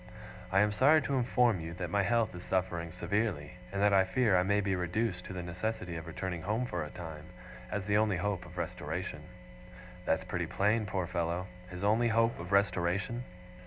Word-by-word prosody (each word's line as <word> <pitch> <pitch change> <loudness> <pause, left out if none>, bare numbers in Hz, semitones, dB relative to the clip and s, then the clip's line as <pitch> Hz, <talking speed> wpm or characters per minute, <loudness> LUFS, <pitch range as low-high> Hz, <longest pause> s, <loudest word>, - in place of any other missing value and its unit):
"I 95 +1 +5
am 105 0 +3
sorry 140 +9 +6
to 140 - -2
inform 125 -4 +3
you 80 +1 -6
that 90 -2 -4
my 100 - +3
health 115 +1 +2
is 90 - -7
suffering 90 -3 -1
severely, 90 -4 -2
and 100 - -2
that 105 -1 +5
I 95 -1 +6
fear 105 +2 +2
I 90 - +5
may 100 +3 +2
be 95 -2 +1
reduced 90 +1 -1
to - - -6
the 90 -1 -4
necessity 90 +1 -3
of 80 0 -6
returning 85 +1 -4
home 110 +8 0
for 90 -8 -2
a 75 - -6
time, 80 -3 -8 0.4
as 105 -2 -2
the 105 0 +3
only 105 -3 +2
hope 95 0 -1
of 90 +1 -13
restoration." 85 0 -4 0.8
That's - - +1
pretty - - -2
plain, 105 +2 +1
poor 95 -2 -1
fellow! 85 0 -1 0.2
His 90 +1 -7
only 110 +4 +3
hope 115 +1 +2
of 90 +2 -7
restoration! 100 +4 +1
95 Hz, 200 wpm, -32 LUFS, 90-105 Hz, 0.8 s, sorry